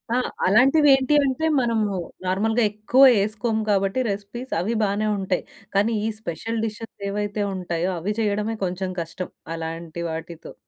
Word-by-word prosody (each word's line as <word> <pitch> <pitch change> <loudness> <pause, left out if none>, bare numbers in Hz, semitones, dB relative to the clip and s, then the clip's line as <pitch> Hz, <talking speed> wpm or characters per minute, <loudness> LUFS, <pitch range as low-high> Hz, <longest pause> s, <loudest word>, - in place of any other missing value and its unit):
ఆ! - - +3 0.3
అలాంటివి 270 +9 +5
ఏంటి 270 +2 0
అంటే, 270 +4 0 0.2
మనము 225 -3 +1 0.4
నార్మల్‌గా 220 +6 +1
ఎక్కువ 215 +5 +2
వేసుకోము 220 +2 0
కాబట్టి 195 +3 +1
రెసిపీస్ 205 +6 -5
అవి 210 +7 -1
బానే 205 +1 0
ఉంటాయి. 190 -1 -1 0.3
కానీ 215 +3 +3
ఈ - - +1
స్పెషల్ 220 +4 -3
డిషెస్ 225 +1 -6 0.2
ఏవైతే 205 +1 -2
ఉంటాయో 175 -1 -2
అవి 200 +6 -2
చేయడమే 210 +1 0
కొంచెం 185 +1 -3
కష్టం 165 +2 -6 0.3
అలాంటి 165 +1 -5
వాటితో. 165 +1 -7
205 Hz, 140 wpm, -23 LUFS, 185-225 Hz, 0.4 s, అలాంటివి